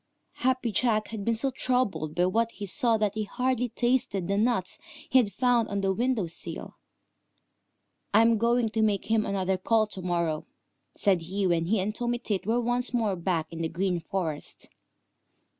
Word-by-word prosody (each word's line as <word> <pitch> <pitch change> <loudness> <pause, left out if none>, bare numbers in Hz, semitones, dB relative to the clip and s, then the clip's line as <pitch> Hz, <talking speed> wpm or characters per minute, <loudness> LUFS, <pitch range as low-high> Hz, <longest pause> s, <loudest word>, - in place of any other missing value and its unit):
Happy 255 -2 +1
Jack 215 0 +1
had 220 -3 -5
been 230 - +1
so 270 +4 0
troubled 205 - -1
by 175 +1 +3
what 225 +5 +1
he 205 - -6
saw 230 +3 +2
that 210 -2 0
he 215 0 -2
had - - -19
hardly 250 -1 0
tasted 240 -6 0
the 200 - 0
nuts 210 -3 0 0.3
he 260 - +5
had 215 -5 +1
found 245 -2 +2
on 200 0 -1
the 195 0 +1
window 240 -1 0
sill. 165 - -6 1.4
"I 220 +2 +6
am 230 -1 +3
going 235 0 +2
to 220 +1 -1
make 210 -1 0
him 220 -1 +2
another 190 -1 0
call 220 +3 +3
to 200 -3 -8
morrow," 170 -3 -1 0.5
said 190 -5 +3
he 190 +4 -2
when 170 -2 +2
he 205 +4 +1
and 200 +3 -1
Tommy 240 +1 -1
Tit 210 -5 -3
were 230 +2 +2
once 245 +1 0
more 220 -5 +1
back 170 -2 -2
in 165 - -5
the 160 - -1
Green 180 +1 -1
Forest. 165 -4 -4
215 Hz, 190 wpm, -27 LUFS, 185-240 Hz, 1.4 s, I